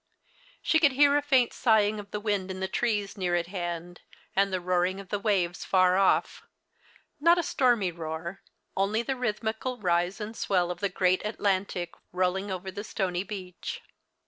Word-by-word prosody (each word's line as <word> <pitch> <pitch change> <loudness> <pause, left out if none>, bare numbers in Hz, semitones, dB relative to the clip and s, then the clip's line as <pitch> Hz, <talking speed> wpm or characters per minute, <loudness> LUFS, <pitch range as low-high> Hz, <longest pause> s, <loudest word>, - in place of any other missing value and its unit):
iShe 320 - +3
could 290 -4 +5
hear 285 +1 +5
a 290 - +3
faint 265 -4 +3
sigh 220 -4 +4
ing 210 +1 -2
of 200 -1 -9
the 210 - -3
wind 205 -3 -1
in 190 0 -5
the 190 - -1
trees 205 -1 -1
near 180 -3 0
at 170 -1 0
hand, 175 -1 -5 0.3
and 195 0 +3
the 185 - 0
roaring 180 +1 0
of 195 -2 -10
the 205 - -1
waves 190 -5 0
far 185 -1 +4
off", 195 0 +2 0.8
not 335 +4 +5
a 345 - +1
stormy 240 - +2
roar, 165 +2 -6
'In - - -34 0.2
only 205 +4 +1
the 265 +3 -2
rhythmical 225 +1 -2
rise 175 -1 0
and 215 +1 -5
swell 180 -5 +1
of 175 - -6
the 200 - +1
f" 185 - -14
U - - -18
great 185 0 +3
Atlantic 195 -4 -1 0.2
roll 180 0 +1
ins: 195 +1 -4
over 190 0 -4
the 200 - -5
stonv 190 -3 -2
beach. 185 -4 -6
195 Hz, 200 wpm, -28 LUFS, 180-220 Hz, 0.8 s, could